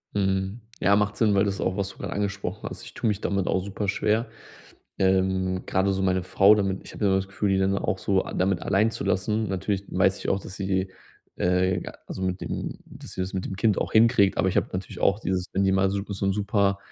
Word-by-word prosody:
Mhm. 95 +2 0 0.2
Ja, 100 - +4
macht 105 0 +1
Sinn, 105 -2 +3
weil 100 0 +4
das 100 -1 -2
auch, 95 +1 -1
was 100 -1 -1
du - - -13
gerade - - -5
angesprochen 100 0 -3
hast. - - -9
Ich 120 - -11
tue 120 - -2
mich 105 -1 0
damit 100 -2 -1
auch 95 - +1
super 100 +1 -4
schwer. 110 +4 +1 0.7
Ähm, 95 -1 +1
gerade 95 +1 +1
so 95 - -1
meine 95 -1 +1
Frau 95 +3 +5
damit 95 -2 0
ich - - -11
habe 105 - -2
immer 95 -1 +4
das 95 0 -1
Gefühl, 100 +1 -1
die 95 - +3
dann 95 +1 +2
auch 95 - -1
so 95 -1 +1
a - - -7
damit 95 -1 +1
allein 100 +3 +2
zu - - -5
lassen. 105 +4 0
Natürlich 95 +1 -1
weiß 95 0 +2
ich - - -3
auch, 100 - +1
dass 95 - -9
sie, 95 -1 -1 0.5
äh 90 0 +1 0.3
also, - - -6
mit 95 0 -2
dem - - -4
dass - - -11
sie - - -3
das 95 +2 -4
mit 95 -1 -2
dem 95 - -4
Kind 105 +1 +2
auch - - -1
hinkriegt. 110 -3 +4
Aber - - +2
ich 95 - +1
habe - - +2
natürlich 95 +1 -5
auch 100 +2 +2
dieses, 95 -4 -2
wenn 95 - +2
die 95 - +3
mal 95 0 +3
so 100 +1 -1
so 100 -1 -3
'n 95 - +2
super, 100 -1 +1
95 Hz, 250 wpm, -25 LUFS, 95-100 Hz, 0.7 s, Frau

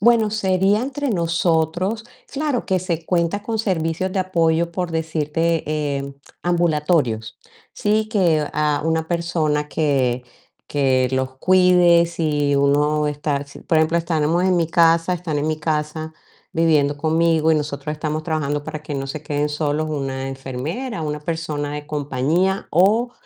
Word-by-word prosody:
Bueno, 225 -1 +4
sería 195 0 +2
entre 280 +1 -2
nosotros, 170 +3 0 0.3
claro 285 -3 -1
que 190 -2 +1
se 170 -3 -3
cuenta 175 +3 0
con 220 +1 -3
servicios 185 -2 -1
de 190 - 0
apoyo, 170 -2 +1
por 180 0 -3
decirte, 160 0 -1
eh, 140 -2 -2 0.3
ambulatorios, 150 -9 0 0.3
¿sí?, 215 +1 0
que 170 -8 +2
a 150 -1 0
una 160 0 0
persona 160 -4 0
que 130 -6 0 0.5
que 130 -3 +2
los 130 0 -2
cuide 180 -1 +5
si 150 -4 0
uno 150 +2 +2
está 145 -1 -2
si 140 - -13
por 160 - +1
ejemplo, 160 +1 +2
estamos 165 +1 +1
en 185 -1 +3
mi 170 -2 +2
casa, 165 +1 +4
están 165 -4 -3
en 145 - -1
mi 155 0 -1
casa 155 0 -2 0.4
viviendo 155 -3 +2
conmigo, 160 +1 +2
y 160 - +5
nosotros 150 -1 -3
estamos 155 0 -3
trabajando 145 -3 -2
para 155 -1 -6
que 150 - -6
no 135 0 -3
se 150 +2 -6
queden 145 0 -1
solos 150 +1 -1
una 135 -3 -3
enfermera, 135 - -5
una 150 -1 -3
persona 150 -2 -3
de 150 0 -6
compañía, 150 +6 0
o 215 +8 +3
160 Hz, 150 wpm, -21 LUFS, 150-175 Hz, 0.5 s, cuide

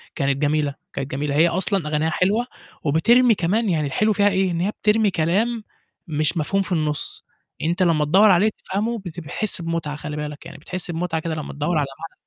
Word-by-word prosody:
كانت 140 -3 0
جميلة، 145 -1 +1 0.2
كانت 135 - -4
جميلة، 140 +1 -2
هي 165 +3 +5
أصلًا 180 -1 0
أغانيها 155 +1 0
حلوة 200 +8 +1 0.4
وبترمي 230 - +4
كمان 205 +5 0
يعني 155 -4 +1
الحلو 215 +10 +1
فيها 205 0 +3
إيه، 190 -2 +1
إن 170 0 -1
هي 200 +3 +1
بترمي 210 -1 +2
كلام 210 +9 0 0.4
مش 155 +2 0
مفهوم 195 +6 +1
في 190 - -6
النُص، 155 -3 -1 0.3
يعني 160 - 0
أنت 185 +2 +1
لمّا 155 -4 +3
تدوّر 195 +7 +6
عليه 195 +5 +4 0.2
تفهمه 220 +4 -1
بت 175 -3 -8
بتحس 175 +4 -4
بمتعة 165 -3 -3
خلّي 150 0 -6
بالك 150 0 -6
يعني، - - -10
بتحس 180 +3 -6
بمتعة 165 -1 -2
كده 160 -1 -3
لمّا 155 - -6
تدوّر 150 +3 -1
على 145 - +2
معنى. 165 - -8
170 Hz, 200 wpm, -22 LUFS, 150-195 Hz, 0.4 s, تدوّر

